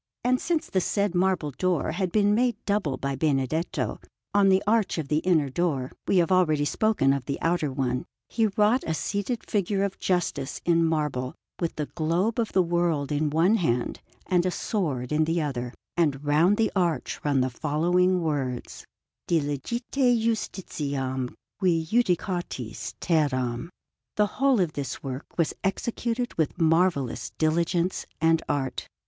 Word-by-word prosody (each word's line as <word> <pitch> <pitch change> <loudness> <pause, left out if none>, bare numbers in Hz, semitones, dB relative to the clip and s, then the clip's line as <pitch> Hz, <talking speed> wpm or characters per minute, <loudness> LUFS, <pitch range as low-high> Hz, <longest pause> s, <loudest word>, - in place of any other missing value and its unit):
And 255 +1 +2
since 330 -2 0
the 190 - 0
said 200 0 0
marble 180 -4 +1
door 175 +1 0
had 180 +1 -2
been 205 +1 +3
made 245 +2 +2
double 200 -10 0
by 140 0 -2
Benedetto, 150 +3 -1 0.3
on 200 -1 +5
the 190 +1 +4
arch 215 -2 +2
of 150 -4 -3
the 150 +1 +2
inner 160 -5 +2
door 135 -4 -1 0.2
we 195 - +3
have 175 0 +3
already 155 -6 +3
spoken 180 -7 +2
of 140 -3 -3
the 140 - -3
outer 165 -4 0
one 125 -2 -1 0.2
he 225 -2 +1
wrought 210 +5 +2
a 160 - 0
seated 205 - -3
figure 200 -1 0
of 200 -1 -3
Justice 145 -8 -1
in 170 -1 +4
marble, 150 -6 -1 0.2
with 170 -2 -2
the 150 - -2
globe 175 +10 0
of 225 - 0
the 185 - +4
world 170 -4 0
in 150 +1 +1
one 170 +9 +3
hand 125 - -1 0.2
and 180 -1 +2
a 185 - +1
sword 150 - -2
in 155 +1 +3
the 165 +2 0
other; 125 -6 -2 0.2
and 150 -4 +1
round 165 +8 +4
the 225 - +2
arch 175 -4 0
run 140 -3 +2
the 130 0 0
following 175 +6 +1
words: 135 -6 -3 0.4
DILIGITE 155 - -1 0.3
JUSTITIAM 145 - -2 0.2
QUI 175 -4 +2
JUDICATIS 175 - -1
TERRAM. 135 -4 0 0.5
The 210 - +4 0.2
whole 270 -4 +4
of 170 -4 +1
this 140 -2 -5
work 135 0 -7
was 165 -3 +1
executed 235 +4 -1
with 155 - 0
marvellous 160 -8 +1
diligence 170 +3 0
and 165 0 +3
art. 135 -2 -2
165 Hz, 155 wpm, -26 LUFS, 145-190 Hz, 0.5 s, on